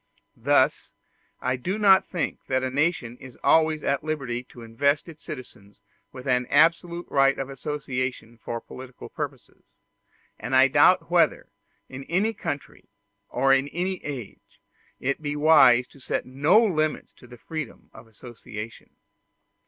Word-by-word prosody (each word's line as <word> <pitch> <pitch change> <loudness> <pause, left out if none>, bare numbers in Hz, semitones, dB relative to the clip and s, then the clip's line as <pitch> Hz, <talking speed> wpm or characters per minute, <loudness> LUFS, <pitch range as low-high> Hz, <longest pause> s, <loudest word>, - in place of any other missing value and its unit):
Thus - - +2 0.5
I 125 0 -1
do 185 +11 -3
not 195 -3 +5
think 175 -3 -3
that 130 0 0
a 130 - -2
nation 140 -5 -1
is 130 -2 -12
always 155 -1 +3
at 140 +1 0
liberty 135 -6 -3
to 120 -1 -13
invest 140 +8 0
its 160 -2 -12
citizens 120 - -10 0.3
with 130 -1 -10
an 125 -1 +1
absolute 170 +3 +2
right 135 0 +3
of 135 0 -5
association 130 -4 -4
for 115 +1 -5
political 130 +1 -11
purposes; - - -7 0.8
and - - -2
I - - +6
doubt - - +4
whether, - - +2 0.4
in 135 +1 -9
any 200 +7 0
country 145 -8 -6 0.4
or 135 +2 +3
in 135 +1 +2
any 180 +4 -3
age, 130 -7 -8 0.4
it 140 +4 -2
be 145 -1 -3
wise 145 -5 +6
to 140 - -18
set - - -3
no 145 +10 +3
limits 155 -6 -1
to 125 -1 -14
freedom 155 +4 -7
of 110 +1 -14
association. 110 -1 -10
135 Hz, 145 wpm, -25 LUFS, 125-155 Hz, 0.8 s, I